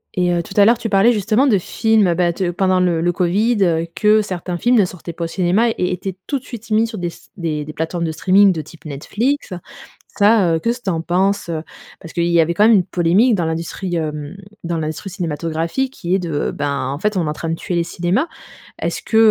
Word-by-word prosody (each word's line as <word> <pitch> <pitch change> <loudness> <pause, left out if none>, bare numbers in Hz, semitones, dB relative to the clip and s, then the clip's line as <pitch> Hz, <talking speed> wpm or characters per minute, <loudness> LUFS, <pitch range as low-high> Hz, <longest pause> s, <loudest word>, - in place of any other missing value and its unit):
et, 180 -1 +1
heu, 175 - +1
tout 195 +4 -3
à 200 - +7
l'heure, 230 +3 +4
tu 225 - -3
parlais 205 +4 +4
justement 215 +5 +2
de 220 -8 +3
films, 210 -1 +2
bah, 175 0 +2
de 175 0 -2
pendant 185 +1 +1
le 175 -3 +1
le 175 +1 +2
covid, 195 +7 +1
heu, 165 -2 +1
que 215 0 +3
certains 180 -2 -4
films 240 +7 +3
ne 200 - +5
sortaient 175 -1 -8
pas 170 +1 -4
au - - -2
cinéma 185 +7 +1
et 180 - 0
étaient 185 +1 -5
tout 280 - -2
de 255 - -24
suite 230 -2 -10
mis 220 +2 +3
sur 225 - -7
des 175 - -4
s 170 - -11
des 155 -4 -2
des 150 - -7
plateformes 165 +2 -3
de 165 - -1
streaming 190 +5 +4
de 165 -3 -2
type 165 - -16
Netflix. 210 - -2 0.6
Ça, 200 -5 +4
qu'est 235 - +2
ce 245 - -10
tu 195 - -1
en 165 -3 -1
penses? 185 +2 0 0.5
Parce 165 - -11
qu'il 170 -1 0
y 170 -1 +4
avait 165 +1 +1
quand 205 - +4
même 230 - +6
une 185 - +2
polémique 185 +9 +3
dans 175 -4 -1
l'industrie 165 +3 -3
hem, 150 -1 -4 0.3
dans 170 0 -2
l'industrie 155 +5 -5
cinématographique 165 - -2
qui 175 +2 -1
est - - +1
de 165 -5 -2
ben, 140 -1 -2
en 140 - -3
fait, 210 +2 0
on 180 - +1
est - - -2
en - - -2
train 165 +1 -5
de 165 - 0
tuer 175 - -4
les 170 - +2
cinémas. 175 - 0 0.6
Est-ce - - -2
que, 220 - -2
180 Hz, 240 wpm, -19 LUFS, 165-210 Hz, 0.6 s, à